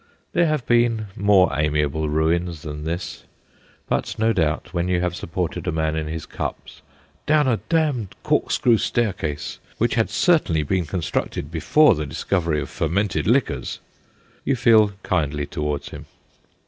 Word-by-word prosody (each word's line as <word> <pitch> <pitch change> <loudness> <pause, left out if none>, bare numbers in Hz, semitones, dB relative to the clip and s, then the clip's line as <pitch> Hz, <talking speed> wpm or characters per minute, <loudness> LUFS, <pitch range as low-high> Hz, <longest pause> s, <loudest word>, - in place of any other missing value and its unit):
There 175 -1 +3
have 155 -5 -1
been 120 -3 +2
more 100 -5 +4
amiable 75 0 0
ruins 80 +1 0
than 75 -1 -6
this; 85 +3 -4 0.6
but, - - -1
no 110 +1 +2
doubt, 80 -2 -1
when 85 0 0
you 90 -1 +1
have 90 0 -1
supported 90 0 -4
a - - +1
man 80 0 -1
in 80 -1 -2
his 80 0 -5
cups - - -6 0.2
' - - -36
down 150 -2 +4
a 120 -3 +2
damned 150 - 0
corkscrew 115 -3 +2
staircase, 90 -11 -2 0.2
which 120 +1 +1
had 115 -2 +1
cer 175 -3 +4
tainly 80 - -1
been 90 -2 0
constructed 75 -3 -3
before 85 - +4
the 75 -1 -3
discovery 80 +1 -1
of - - -5
fermented 95 +4 -1
liquors/ - - +1 0.7
you 135 - +1
feel 110 -4 +5
kindly 75 -1 0
towards 75 0 -3
him. - - -10
90 Hz, 155 wpm, -22 LUFS, 75-115 Hz, 0.7 s, feel